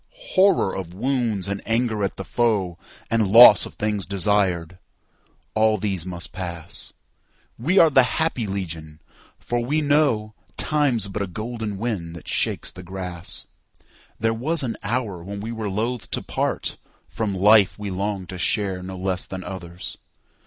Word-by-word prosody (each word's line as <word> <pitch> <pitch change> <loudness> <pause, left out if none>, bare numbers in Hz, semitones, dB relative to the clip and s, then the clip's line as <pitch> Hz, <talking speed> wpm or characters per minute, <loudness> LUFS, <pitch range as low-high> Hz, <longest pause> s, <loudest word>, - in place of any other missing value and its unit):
Horror 190 - +4
of 90 -2 -6
wounds 115 -4 -1
and 100 0 -3
anger 115 -2 0
at 100 - -1
the 95 - -4
foe, 100 -7 0 0.3
And 115 -2 +3
loss 115 -2 +9
of - - -14
things 105 -2 -1
desired; 95 -3 +1 0.7
all 110 0 +3
these 95 -4 -2
must 85 -2 -5
pass. 85 -3 -3 0.7
We 165 +11 +1
are 165 -4 +7
the 135 - +7 0.2
happy 155 -9 +1
legion, 80 -6 -5 0.4
for 120 - -2
we 145 +6 +1
knowTime's 140 -2 +1
but 100 +1 -4
a 100 - -1
golden 110 +1 -5
wind 95 -7 -3
that 85 - -11
shakes - - -1
the 90 - -10
grass. 90 -1 -6 0.7
There 115 0 +1
was 145 +7 -1
an 120 -3 -2
hour 105 -5 -2
when 100 +2 -6
we 110 +3 -5
were 110 -3 -3
loth 115 +4 -2
to - - -2
partFrom 105 -3 -3
life 105 0 +5
we 105 -2 -5
longed 95 0 -3
to 95 - -6
share 95 -1 0
no 95 +1 -7
less 95 0 -1
than 95 -1 -6
others. 90 -2 -7
100 Hz, 150 wpm, -23 LUFS, 95-115 Hz, 0.7 s, loss